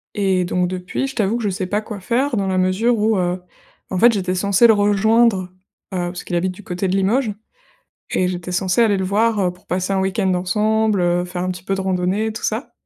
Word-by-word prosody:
Et 190 -3 +1
donc 180 0 0
depuis, 185 +8 -3
je 270 - -8
t'avoue 215 0 +1
que 240 - -5
je 205 - +1
sais 185 -1 -3
pas 205 +3 -1
quoi 215 -2 -7
faire 245 +7 0
dans 200 -2 0
la 185 -1 0
mesure 195 +6 +2
où, 215 0 +2
heu, 180 0 -1 0.5
en 185 - -1
fait 240 +4 +7
j'étais 185 -4 -1
censée 200 +4 +3
le 225 - +6
rejoindre. 210 0 +3 0.5
Heu, - - -1
parce 175 0 -7
qu'il 175 - -4
habite 180 +2 0
du 185 +3 -13
côté 180 +1 -3
de 185 - 0
Limoges 215 +5 +1 0.8
et 185 - +1
j'étais 180 -1 -4
censée 185 +4 +1
aller 210 -3 +3
le 190 - -1
voir, 215 +3 +1
heu, 185 -2 +1
pour 180 0 -23
passer 185 +2 -1
un 190 - +1
week-end 190 0 0
ensemble, 210 +3 +1
heu, 175 0 +1
faire 180 0 -4
un 185 - -1
petit 180 -1 -8
peu 195 +1 -1
de 195 - -3
randonnée, 190 +3 0
tout 220 - -8
ça. 225 +5 -2
190 Hz, 240 wpm, -20 LUFS, 180-215 Hz, 0.8 s, fait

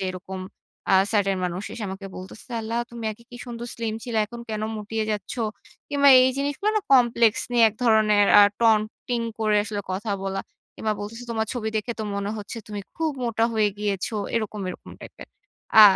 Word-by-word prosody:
যে, 190 - -2
এরকম 185 +1 -7 0.5
আ - - +7 0.2
certain 195 -2 +2
মানুষ 180 +2 -3
এসে 230 - -6
আমাকে 195 +1 -6
বলতেছে 190 +6 -10
"আল্লাহ! 225 +2 -2
তুমি 235 -1 -7
আগে 235 - -17
কি 245 - -9
সুন্দর 240 0 -6
স্লিম 225 -2 -3
ছিলা, 230 -3 -1
এখন 235 +2 -9
কেন 215 0 -3
মুটিয়ে 215 +1 -3
যাচ্ছ?" 205 -3 -3 0.6
কিংবা 285 0 +4
এই 260 - +4
জিনিসগুলো 285 +9 0
না - - +3
complex 235 -3 +5 0.2
নিয়ে 235 -1 +6
এক 215 - -10
ধরনের 215 -2 +5
আ - - +10 0.2
টন-টিং 225 +2 +2 0.2
করে 215 -1 +2
আসলে 210 -1 -3
কথা 205 +3 -3
বলা। 195 0 -2 0.3
কিংবা 215 -1 -1
বলতেছে 230 +4 -7
"তোমার 220 -1 -1
ছবি 220 -3 -2
দেখে 225 +3 -2
তো - - -1
মনে 200 +1 -2
হচ্ছে 210 +3 -7
তুমি 205 -1 -4 0.2
খুব 320 -1 0
মোটা 230 -1 +1
হয়ে 215 -1 +3
গিয়েছো।" 205 +1 -2 0.2
এরকম, 215 -2 -2
এরকম - - -8
টাইপের। - - -11 0.5
আ - - +12
220 Hz, 190 wpm, -24 LUFS, 205-235 Hz, 0.6 s, আ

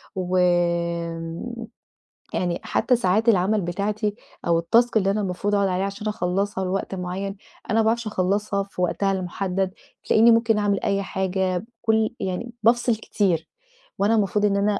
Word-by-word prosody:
و 185 0 -1
آمم، 170 +4 -1 0.7
يعني 175 -1 -1
حتى 250 - +2
ساعات 220 +1 +2
العمل 200 +1 +3
بتاعتي، 205 +4 -2 0.3
أو 170 -1 +3
التاسك 230 +7 +3
اللي 195 -1 +2
أنا 210 - 0
المفروض 200 +2 -1
أقعد 200 -1 +2
عليها 185 +1 0
عشان 200 +2 -6
أخلّصها 195 -1 -1
لوقت 195 +1 -2
معيّن، 190 +2 -4 0.3
أنا 220 +2 +2
ما - - +4
باعرفش 230 +1 +1
أخلّصها 200 0 0
في 195 -2 -7
وقتها 195 +2 +1
المحدّد، 190 0 -2 0.3
تلاقيني 230 +2 +6
ممكن 230 -1 +3
أعمل 205 -2 +1
أي 200 0 +1
حاجة 190 -1 -1
بكُلّ 225 +2 -1
يعني 190 +6 -3
بافصِل 240 +1 +3
كتير، 185 -7 -1 0.5
وأنا 210 +3 +3
المفروض 210 0 +1
إن 200 -1 +2
أنا 200 0 +1
200 Hz, 155 wpm, -23 LUFS, 180-215 Hz, 0.7 s, تلاقيني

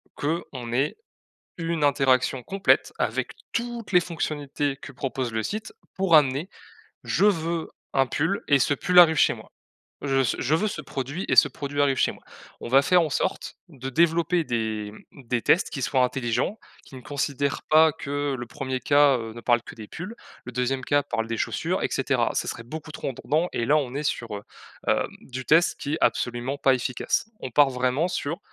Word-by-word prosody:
qu'on 140 -6 -3
ait 135 - 0 0.6
1 165 -3 -1
interaction 130 -2 +2
complète 195 +6 +2
avec - - -1 0.2
toutes 235 -3 -4
les 180 - +6
fonctionnalités 145 -4 -3
que 135 - -11
propose 130 -2 -3
le 110 0 -1
site, 215 - -5 0.2
pour 190 -3 +2
amener: 145 +3 +4 0.6
«Je 200 - +1
veux 165 -4 0 0.2
un 135 -1 +3
pull» 170 +7 -1
et 140 -2 +5
ce 145 +3 +2
pull 180 +6 +2
arrive 165 -2 +9
chez - - +4
moi. - - -14 0.5
Je 135 -1 -1
veux 135 - +3
ce - - 0
je 140 +5 +1
veux 210 +6 +1
ce 160 - -5
produit 140 +5 -5
et - - +3
ce - - +8
produit 145 -2 -4
arrive 135 -2 +2
chez - - +2
moi. - - -17 0.4
On - - -6
va 135 +3 +6
faire 180 +3 +4
en 155 - -1
sorte 185 - -2
de 135 -4 -7
développer 170 +2 +2
des, 110 -4 -2 0.2
mmh, 140 - -15
des 120 -1 0
tests 180 - +3
qui 135 - -5
soient 130 +1 +2
intelligents, 125 - -1 0.3
qui - - -14
ne - - -9
considèrent 140 0 -2
pas 155 0 +6
que 145 -1 -3
le 120 - -5
1er 130 -1 -4
cas, 145 0 +5
heu, 115 -1 -6
ne 120 - -8
parle 120 -1 +2
que - - -11
des 110 -2 -10
pulls, 185 +7 -7 0.3
le 125 - -8
2e 125 +1 -1
cas 145 0 +2
parle 115 -5 -2
des 115 0 -3
chaussures - - -1
et - - +1
cetera. - - +1
Ça - - -1
serait 115 - -5
beaucoup 155 +4 -8
trop - - -4
redondant 155 +6 -1
et 115 - -1
là 150 +3 +4
on 135 -4 -1
est 145 - -2
sur, 115 -6 -2
heu, 100 - -8 0.5
hem, - - +2 0.2
du 130 0 -7
test 165 +6 +3
qui 145 - -2
est - - -2
absolument 120 +3 0
pas 135 -2 +4
efficace. 130 - -1
On 130 - -5
part 145 +3 +5
vraiment 130 +6 0
sur, 165 -1 -3
140 Hz, 205 wpm, -25 LUFS, 130-160 Hz, 0.6 s, arrive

